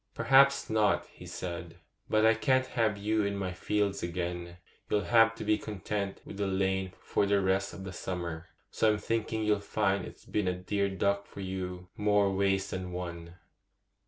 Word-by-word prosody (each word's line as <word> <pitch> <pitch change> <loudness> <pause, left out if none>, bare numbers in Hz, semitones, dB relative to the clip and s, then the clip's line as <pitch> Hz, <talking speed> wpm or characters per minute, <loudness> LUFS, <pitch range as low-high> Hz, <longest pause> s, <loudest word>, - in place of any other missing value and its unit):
'Perhaps 140 +1 +5
not,' 110 -2 +2
he - - -12
said; 85 -1 -6 0.3
'but 110 0 +4
I 110 - +7
can't 130 +3 +2
have 115 -5 0
you 105 +1 +1
in 100 0 -1
my 95 -2 -3
fields 100 +1 0
again: 85 0 -4 0.3
you'll 105 - +2
have 115 -1 +5
to 115 - -6
be 105 0 +2
content 100 -1 -4
with 100 - -9
the 100 -1 0
lane 95 -1 0
for 100 - 0
the 100 0 +3
rest 95 0 +1
of 95 - -8
the 95 -1 -6
summer, 85 -2 -4 0.2
so 110 -1 +3
I'm - - -1
thinking 110 0 -1
you'll 105 -1 +2
find 100 -2 0
it's - - -11
been 105 -3 -1
a 90 - +1
dear 100 +2 0
duck 100 +1 0
for 100 - -9
you 90 -1 -5
more 105 -2 +2
ways 95 0 +1
than 95 -1 -4
one. 85 -1 -6
100 Hz, 185 wpm, -30 LUFS, 90-105 Hz, 0.3 s, I